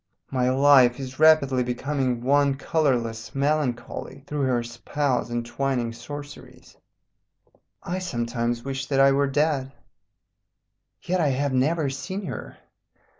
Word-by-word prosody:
My 125 -1 +1
life 130 -2 +5
is 130 0 -7
rapidly 155 -5 +5
becoming 125 0 -2
one 140 +1 +3
colourless 125 -7 -1
melancholy 140 -2 -2
through 145 -2 -1
her 120 -2 +1
spells 125 +2 -2
and 120 0 -3
twining 125 -2 -2
sorceries. 145 +5 -10 1.1
I 180 +2 -3
sometimes 120 -7 -2
wish 135 -1 -4
that 135 -1 0
I 135 0 +6
were 140 +1 +2
dead. 140 -1 0 1.3
"Yet 185 0 0
I 155 - +2
have 140 0 0
never 140 +2 +1
seen 190 +8 -5
her. - - -7
135 Hz, 125 wpm, -25 LUFS, 125-145 Hz, 1.3 s, I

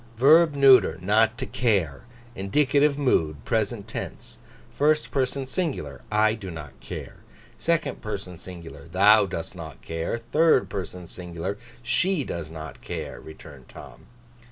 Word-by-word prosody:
'Verb 155 +4 +6
neuter, 130 - +6
not 110 +5 +2
to - - -3
care. 95 - 0 0.3
Indicative 140 +8 +2
mood, 80 - +1
present 110 -2 -1
tense. - - -7 0.3
First 150 +1 +1
person 135 0 0
singular, 130 - -3
I 110 0 +3
do 105 -4 -7
not 75 -5 -9
care; - - -8 0.4
second 170 -1 0
person 100 -4 -5
singular, 85 -1 -10
thou 100 +2 +5
dost 85 -1 -5
not 80 -5 -9
care; 80 +7 -3
third 120 - +3
person 90 -2 -5
singular, 90 +2 -5 0.3
she 175 +6 +1
does 85 -9 -5
not 80 -4 -9
care,' - - -6
returned 75 -4 -13
Tom. - - -13
100 Hz, 130 wpm, -25 LUFS, 85-135 Hz, 0.4 s, Verb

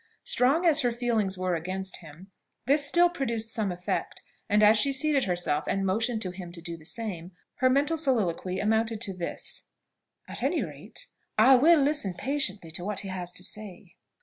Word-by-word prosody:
Strong 280 +8 +2
as 315 -3 +5
her 245 -2 +1
feelings 230 -5 -1
were 185 0 -1
against 185 +3 -4
him, 170 +4 -14 0.3
this 285 +3 +4
still 345 +5 +5
produced 235 -9 -3
some 210 -4 -1
effect; 180 0 -4 0.3
and 210 0 +3
as 210 +1 +7
she 275 +6 +3
seated 275 0 +2
herself, 175 -5 0
and 195 0 -1
motioned 225 +4 0
to 185 - -4
him 180 -1 -9
to 170 - -10
do 170 0 -5
the 160 -2 -15
same, 185 -6 -5 0.2
her 255 - +3
mental 290 +5 +1
soliloquy 195 - 0
amounted 220 +1 0
to 205 -4 -3
this: 175 -1 -5 0.6
"At - - -4
any - - 0
rate, - - -9 0.3
I 240 +5 +7
will 315 +6 +5
listen 280 - +1
patiently 205 - 0
to 170 +2 -3
what 205 +1 -1
he 195 - -7
has 180 -2 -4
to 180 - -7
say." 195 -3 -6
210 Hz, 185 wpm, -27 LUFS, 180-260 Hz, 0.6 s, as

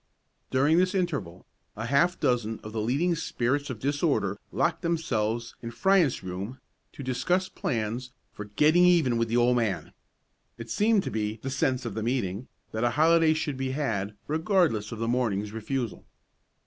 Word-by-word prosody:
During 145 +6 +3
this 185 +2 +1
interval, 140 - -2 0.3
a 110 - -4
half 155 +8 +2
dozen 120 -5 0
of 110 - -7
the 110 - -1
leading 140 +11 +1
spirits 145 -3 -1
of 130 - -4
disorder 140 - 0
locked - - 0
themselves 120 -9 -1
in 115 - -5
Fryant's 165 +4 +2
room 95 +7 -5 0.3
to 140 - -8
discuss 135 +9 0
plans 115 +2 -3 0.2
for 105 - -7
"getting 150 - +4
even 170 -9 +4
with 115 - +1
the 115 +2 0
old 120 +1 +4
man." 110 -6 -1 0.6
It 115 0 -8
seemed 210 - +3
to - - -4
be 105 0 -2
"the 135 - -3
sense 130 -1 0
of 115 - -3
the 110 - -3
meeting" 115 -2 -2 0.2
that 110 +1 -2
a 120 - +4
holiday 160 +4 +4
should 150 -3 -2
be 130 0 -2
had, 105 -8 -2
regardless 160 - +1
of 115 - -5
the 115 +1 -2
morning's 110 -4 0
refusal. 115 +1 -3
125 Hz, 170 wpm, -27 LUFS, 110-155 Hz, 0.6 s, getting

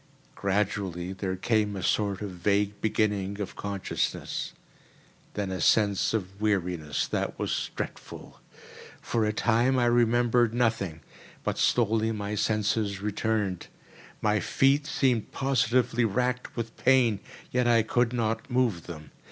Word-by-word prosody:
Gradually 95 -2 -1
there 95 0 -3
came 105 +1 0
a 95 - -5
sort 100 0 0
of 100 - -4
vague 100 +3 0
beginning 105 -2 0
of 100 - -5
consciousness; 100 -2 -3 0.8
then 100 -2 -2
a 95 -2 -3
sense 100 0 +3
of 100 -2 -4
weariness 90 -8 0
that - - -2
was - - -2
dreadful. - - -7 0.6
For 115 -2 0
a 105 - +1
time 120 +4 +2
I 120 - +3
remembered 120 0 +3
nothing; 110 -9 0 0.4
but - - -2
slowly 115 -1 +2
my 105 -1 -4
senses 105 -1 0
returned. 105 -2 -1 0.6
My 105 0 +3
feet 140 +7 +2
seemed 125 -8 +1
positively 125 -2 +1
racked 125 +3 -1
with 115 -1 -4
pain, 125 -5 +3 0.3
yet 125 -1 +1
I 115 -2 +4
could 120 +1 +1
not 115 0 -1
move 120 -9 0
them. 80 -3 -9
110 Hz, 130 wpm, -27 LUFS, 100-120 Hz, 0.8 s, I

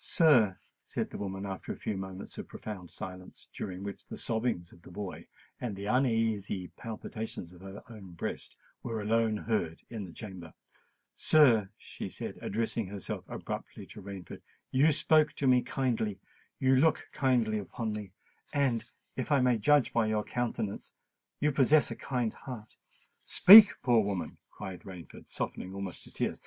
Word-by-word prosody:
"Sir," 130 - +4 0.2
said - - -4
the - - -6
woman, 95 -1 -4
after 95 -1 -5
a - - -5
few 105 - -3
moments 95 0 -7
of - - -6
profound 95 -5 -8
silence, 90 0 -9
during 95 -1 -5
which 100 -1 -7
the - - -7
sobbings 110 -7 -1
of 85 - -17
the - - -14
boy 100 -2 -7 0.3
and 115 -5 -3
the 100 +1 -6
uneasy 110 -6 +1
palpitations 110 -5 -7
of 90 - -15
her 95 +1 -9
own 105 -6 -11
breast 85 - -5 0.2
were 115 -2 -3
alone 110 +1 +1
heard 105 -8 -2
in 110 -4 -4
the 90 - -10
chamber,—"sir," 105 - 0
she - - -7
said, - - -6
addressing 115 0 -2
herself 100 0 -5
abruptly - - -6
to 110 - -11
Rainford, 95 -3 -8 0.3
"you 140 +5 +5
spoke 155 0 +3
to 145 - -3
me 125 -1 +5
kindly—you 125 +1 -1
look 155 +3 +3
kindly 120 -5 +2
upon 110 +2 -4
me,—and, 115 +4 -3 0.3
if 130 +2 -3
I 145 - +5
may 125 -3 +3
judge 145 +4 +4
by 115 -2 +2
your 110 -1 0
countenance, 115 -4 -3 0.5
you 150 +1 +2
possess 145 +2 +4
a - - -3
kind 125 -4 -2
heart——" 120 -5 -9 0.5
"Speak, 205 +2 +10
poor 120 -4 +4
woman!" 100 -3 -3
cried 90 -2 -8
Rain, 90 -4 -9 0.2
softened 95 +1 -5
almost 100 -2 -6
to - - -14
tears. - - -2
110 Hz, 155 wpm, -31 LUFS, 95-125 Hz, 0.5 s, Speak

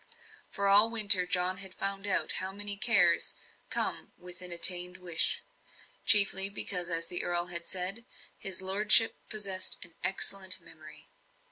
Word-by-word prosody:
For, 200 -1 -5
all 205 +3 +5
winter, 200 -5 +2
John 180 +1 -3
had 190 -1 -8
found 195 0 -6
out 195 - -2
how 190 +1 -7
many 205 +1 -2
cares 195 -5 +1 0.3
come - - -4
with 180 0 -10
an 180 -1 -8
attained 180 +1 +2
wish. 175 -3 -2 0.6
Chiefly, 200 -4 +7
because, 180 -3 -1
as 165 -1 -3
the 175 - 0
earl 175 0 0
had 170 0 -4
said, 190 +5 -5 0.3
his 190 -2 -6
lordship 210 +4 +5
possessed 200 -4 -2
an 170 - -16
"excellent 190 -1 -2
memory." 155 -2 -17
190 Hz, 145 wpm, -27 LUFS, 180-200 Hz, 0.6 s, Chiefly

